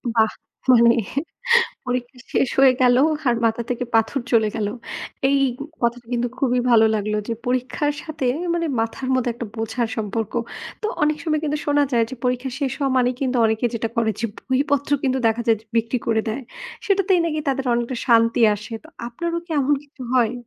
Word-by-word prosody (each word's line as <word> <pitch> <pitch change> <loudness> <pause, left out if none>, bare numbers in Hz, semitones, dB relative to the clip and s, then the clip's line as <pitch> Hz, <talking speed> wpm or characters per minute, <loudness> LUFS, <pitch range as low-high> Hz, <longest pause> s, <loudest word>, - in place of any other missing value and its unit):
বাহ! 220 -1 +4 0.4
মানে 235 -1 +6 0.9
পরীক্ষা 250 0 -3 0.2
শেষ 265 - +2
হয়ে 265 -1 +7
গেল 245 0 +5 0.3
আর 240 - +4
মাথা 230 +1 +1
থেকে 245 0 -1
পাথর 225 +4 +2
চলে 220 -2 +4
গেল। 210 -2 -1 0.6
এই 280 - +3 0.4
কথাটা 235 0 0
কিন্তু 245 0 0
খুবই 250 -2 +2
ভালো 225 -1 +6
লাগলো 210 0 -1
যে, - - 0
পরীক্ষার 255 +4 0
সাথে 315 -4 -4 0.3
মানে 335 -1 0
মাথার 230 +3 -3
মধ্যে 250 -2 +1
একটা 235 -1 -5
বোঝার 225 +1 -2
সম্পর্ক। 220 0 -3 0.5
তো - - 0 0.2
অনেক 300 0 +3
সময় 310 -2 0
কিন্তু 300 0 -1
শোনা 290 0 +3
যায় 230 -1 +3
যে, - - -5
পরীক্ষা 250 +1 0
শেষ 270 -2 0
হওয়া 275 -2 0
মানেই 250 0 +2
কিন্তু 260 -1 0
অনেকে 220 +2 +1
যেটা 230 0 -1
করে 230 -1 +2
যে, 230 - +1 0.2
বইপত্র 280 +1 +1
কিন্তু 265 -1 +1
দেখা 225 +1 +1
যায় 225 -1 +4
যে - - -24
বিক্রি 230 +2 +1
করে 220 -1 +2
দেয়। 230 +5 -3 0.4
সেটাতেই 385 -2 +3
নাকি 310 -2 -1
তাদের 270 -1 -1
অনেকটা 240 +2 -2
শান্তি 230 0 +4
আসে। 210 +3 -9
তো 315 - -14 0.2
আপনারও 335 +8 -3
কি 345 - -21
এমন 285 +2 +3
কিছু 285 -2 -13
হয়? 235 -3 +3
245 Hz, 185 wpm, -22 LUFS, 230-275 Hz, 0.9 s, হয়ে